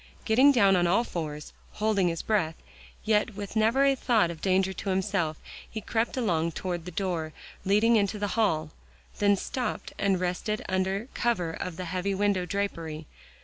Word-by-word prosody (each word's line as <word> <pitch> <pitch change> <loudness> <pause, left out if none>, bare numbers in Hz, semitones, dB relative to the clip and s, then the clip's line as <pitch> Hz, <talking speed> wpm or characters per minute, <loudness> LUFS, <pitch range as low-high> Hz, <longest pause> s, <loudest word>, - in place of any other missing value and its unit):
Getting 255 +6 +6
down 200 -7 +5
on 175 -1 +3
all 200 +7 +3
fours, 150 -8 -5 0.2
holding 210 -4 +1
his 165 -1 -2
breath, 180 -7 +1 0.5
yet 215 0 +1
with 205 +1 -6
never 225 +6 +3
a 275 - +5
thought 220 -9 +2
of 160 -2 -10
danger 190 0 +2
to 195 - -5
himself, 190 -5 0 0.3
he 220 - -5
crept 225 +4 -1
along 170 -9 0
toward 175 -1 -4
the 180 - -6
door 165 -3 -2 0.3
leading 215 +4 +4
into 205 0 0
the 205 0 -2
hall, 160 -9 +1 0.5
then 205 -1 +4
stopped 250 +5 -4
and 195 -2 +2
rested 185 +4 -2
under 190 +4 -1
cover 205 -9 0
of 165 0 -5
the 185 - -4
heavy 185 +3 -2
window 195 -2 +1
drapery. 165 -5 -3
195 Hz, 170 wpm, -28 LUFS, 175-215 Hz, 0.5 s, Getting